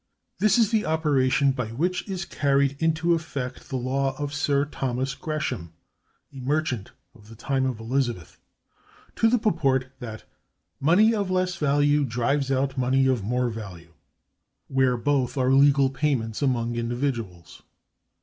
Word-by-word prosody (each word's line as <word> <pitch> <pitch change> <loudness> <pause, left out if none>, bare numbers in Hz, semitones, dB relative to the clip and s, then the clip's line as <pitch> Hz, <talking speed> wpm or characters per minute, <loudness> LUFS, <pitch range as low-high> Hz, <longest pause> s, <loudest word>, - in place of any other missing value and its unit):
This 215 0 +4
is 230 -2 +3
the 220 -2 +2
operation 140 -3 +2
by 125 -4 -3
which 175 - -2
is 185 -2 -3
carried 140 -4 +1
into 160 +1 +2
effect 140 -6 -4
the 135 - -4
law 135 +1 -1
of 145 -1 -3
Sir 145 -1 +1
Thomas 130 -2 -3
Gresham 145 - -4 0.6
(a 135 - -9
merchant 130 -5 -1 0.2
of 110 -3 -18
the 115 - -11
time 130 +3 -1
of 125 -4 -4
Elizabeth) 115 - -2 0.8
to 225 - +3
the 245 - +3
purport 135 - +1
that 110 -4 -8 0.6
"money 190 +10 +4
of 200 -4 -1
less 185 -1 0
value 145 0 +2
drives 135 +3 0
out 135 0 0
money 130 +1 +2
of 130 -5 +1
more 125 +3 0
value," 90 -7 -9 0.8
where 130 -2 +2
both 140 +1 0
are 130 0 +2
legal 140 -1 +5
payments 135 -6 -1
among 120 -4 0
individuals. 115 - -4
135 Hz, 145 wpm, -25 LUFS, 125-150 Hz, 0.8 s, legal